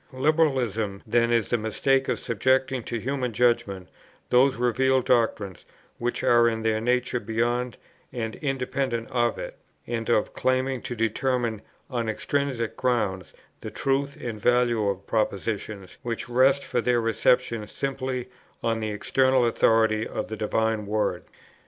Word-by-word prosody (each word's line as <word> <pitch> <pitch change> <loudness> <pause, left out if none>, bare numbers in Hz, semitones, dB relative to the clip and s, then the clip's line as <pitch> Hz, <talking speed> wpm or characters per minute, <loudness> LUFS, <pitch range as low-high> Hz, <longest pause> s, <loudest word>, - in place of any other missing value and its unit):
Liberalism 130 -9 +1
then 115 +1 +2
is 115 -2 +1
the 120 - +2
mistake 130 +5 +1
of - - 0
subjecting 130 +3 +1
to 120 - -3
human 125 0 -2
judgment 105 -5 +1 0.4
those 130 +2 +5
revealed 130 +2 +2
doctrines 110 -6 +1 0.4
which 120 +1 -2
are 120 -1 +5
in 110 -1 -3
their 110 -1 +1
nature 125 +1 +1
beyond 120 +2 -1 0.3
and 110 -2 -4
independent 130 -4 -2
of 120 -2 +1
it, - - -7 0.3
and 115 -1 -3
of 110 -3 +2
claiming 130 0 0
to 120 - -5
determine 115 0 0 0.3
on 120 -4 -2
intrinsic 130 0 -2
grounds 105 -7 -1 0.3
the - - -6
truth 140 +1 -1
and 115 -3 -5
value 120 -2 +2
of 100 0 -4
propositions 105 -2 -2
which 115 -1 -4
rest 130 +3 +3
for 120 - -1
their 120 0 +2
reception 115 0 +1
simply 130 -1 -3 0.4
on 115 -1 0
the 110 -1 -2
external 130 +4 +2
authority 110 -1 +3
of - - -4
the 110 - -4
Divine 110 0 0
Word. 105 +1 -1
120 Hz, 140 wpm, -26 LUFS, 110-130 Hz, 0.4 s, those